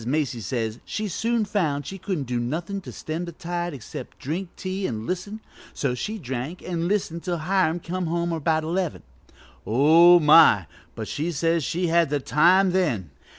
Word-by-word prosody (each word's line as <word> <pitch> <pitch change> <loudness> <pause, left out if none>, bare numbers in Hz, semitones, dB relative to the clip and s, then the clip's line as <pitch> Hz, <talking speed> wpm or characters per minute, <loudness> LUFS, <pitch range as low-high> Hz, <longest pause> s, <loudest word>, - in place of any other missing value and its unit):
Macy 135 0 -1
says 110 +1 -3
she 215 0 -3
soon 225 +4 0
found 160 -9 -1
she 195 - -7
couldn't 180 -6 -2
do 125 -2 -2
nothin' 170 +11 -3
to - - -9
stem 160 +3 -5
the 170 - -7
tide 175 +1 -4
except 130 -6 -8
to - - -19
drink 170 +6 -3
tea 190 +1 -3
an' 110 -1 -4
listen, 200 +4 -4 0.3
so 135 -3 -1
she 210 - -4
drank 135 - -5
an' 170 -1 -2
listened 180 -4 -1
till 175 -1 -2
Hiram 175 0 +1
come 180 +1 -3
home 170 +1 -1
about 160 0 0
eleven. 175 +1 -2 0.6
Oh, 160 +9 +6
my, 150 - +6 0.3
but - - -5
she 160 +4 -2
says 165 0 0
they 175 +2 -1
had 170 -2 +3
the 145 0 0
time 180 +7 +4
then! 130 - 0
170 Hz, 180 wpm, -24 LUFS, 145-185 Hz, 0.6 s, Oh